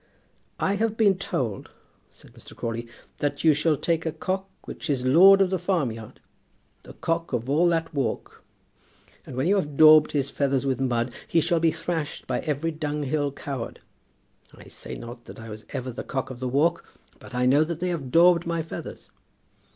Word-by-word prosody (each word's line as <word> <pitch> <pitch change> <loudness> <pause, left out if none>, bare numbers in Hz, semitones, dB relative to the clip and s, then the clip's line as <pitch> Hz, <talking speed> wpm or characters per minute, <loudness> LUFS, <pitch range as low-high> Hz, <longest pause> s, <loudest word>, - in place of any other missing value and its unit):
"I 200 +1 +1
have 220 +1 -1
been 200 -4 +3
told," 115 - -3 0.4
said - - -19
Mr. - - -14
Crawley, 115 0 -4 0.3
"that 145 - -2
you 160 -2 +6
shall 150 +1 +1
take 165 +1 0
a 160 - -1
cock 190 +4 -3
which 165 - -7
is 130 -3 0
lord 190 +9 +7
of 190 -1 +2
the 190 - 0
farmyard, 135 - -2 0.6
the - - -13
cock 165 -2 -2
of 120 0 -2
all 155 +6 +3
that 165 -1 0
walk, 135 -6 -3 0.8
and 130 - -8
when 130 +3 0
you 200 +4 +3
have 150 -7 -3
daubed 155 -1 +7
his 140 -2 -1
feathers 140 -1 0
with 135 -1 -1
mud, 120 -1 0
he 165 - +2
shall 170 +1 +1
be 165 0 +3
thrashed 160 -4 -4
by 125 - -1
every 155 +2 -2
dunghill 150 -2 -2
coward. 135 -3 -6 0.8
I - - -14
say - - -8
not 120 0 -10
that - - -11
I 115 0 -9
was 110 0 -9
ever 130 0 -4
the 125 - -6
cock 130 -1 -4
of 125 - -9
the 130 0 -2
walk, 155 +7 +1 0.4
but 125 - -11
I 125 0 +1
know 140 +4 +5
that 165 0 -4
they 180 - -1
have 155 -7 -3
daubed 170 +3 +5
my 170 -1 -1
feathers." 165 - -9
150 Hz, 190 wpm, -25 LUFS, 130-170 Hz, 0.8 s, lord